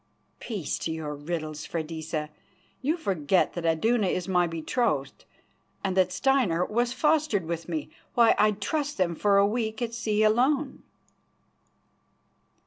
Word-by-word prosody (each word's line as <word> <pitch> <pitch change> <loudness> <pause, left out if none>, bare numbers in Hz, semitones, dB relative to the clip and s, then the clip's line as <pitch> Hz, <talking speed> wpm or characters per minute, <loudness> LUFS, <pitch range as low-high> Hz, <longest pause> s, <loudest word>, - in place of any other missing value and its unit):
"Peace 205 - -3
to 165 - -3
your 160 -2 -4
riddles, 155 0 -5
Freydisa. 160 -1 -4 0.5
You 305 +6 0
forget 185 - +1
that 170 -1 -3
Iduna 210 +6 +2
is 180 -1 -1
my 180 -2 +2
betrothed 165 - -2 0.6
and 190 -2 -1
that 185 -1 +3
Steinar 185 -5 +2
was 240 +2 0
fostered 295 - +1
with 170 +1 -4
me. 160 -3 -3 0.2
Why, 235 -2 +6
I'd 210 -1 +3
trust 295 +6 -2
them 180 -2 +1
for 200 +4 +2
a 200 - +6
week 220 0 -1
at 235 -2 -3
sea 215 -2 0
alone." 265 +7 +2
195 Hz, 135 wpm, -27 LUFS, 165-235 Hz, 0.6 s, Why